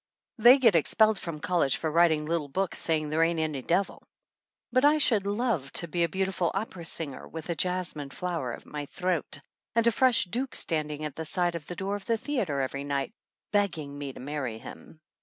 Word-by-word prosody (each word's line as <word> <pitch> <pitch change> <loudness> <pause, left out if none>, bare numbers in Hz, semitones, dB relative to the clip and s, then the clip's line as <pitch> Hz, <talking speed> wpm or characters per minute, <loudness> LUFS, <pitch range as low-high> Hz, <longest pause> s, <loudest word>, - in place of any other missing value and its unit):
They 240 +4 +9
get 235 -6 +5
expelled 215 +6 +4
from 165 -3 -5
college 170 -4 +1
for 160 - -2
writing 160 -2 +4
little 165 -2 -1
books 190 +7 -1
saying 155 -2 0
there 155 +2 +1
ain't 165 0 +2
any 155 -4 -1
devil. 180 +8 0 0.7
But 255 +2 +3
I 295 +1 +6
should 220 -9 +3
love 205 - 0
to 170 - -1
be 170 +2 0
a 170 - +1
beautiful 190 -1 0
opera 190 -4 -4
singer, 155 -5 -5
with 160 +1 -6
a - - -1
jasmine 180 -5 -2
flower 165 -4 -3
at - - -10
my 145 -1 -6
throat, 180 -5 -2 0.4
and 230 0 +3
a 235 - +5
fresh 255 +1 +4
duke 245 +8 -3
standing 155 -2 -2
at 150 -2 -5
the 160 - -4
side 175 +1 +1 0.2
door 200 +1 -2
of 205 - -7
the 230 -1 +2
theater 210 - -1
every 140 +1 -3
night, 140 +6 -2 0.4
begging 170 -9 0
me 145 -1 -5
to - - -12
marry 130 -4 -4
him. 155 - -12
170 Hz, 195 wpm, -28 LUFS, 150-200 Hz, 0.7 s, They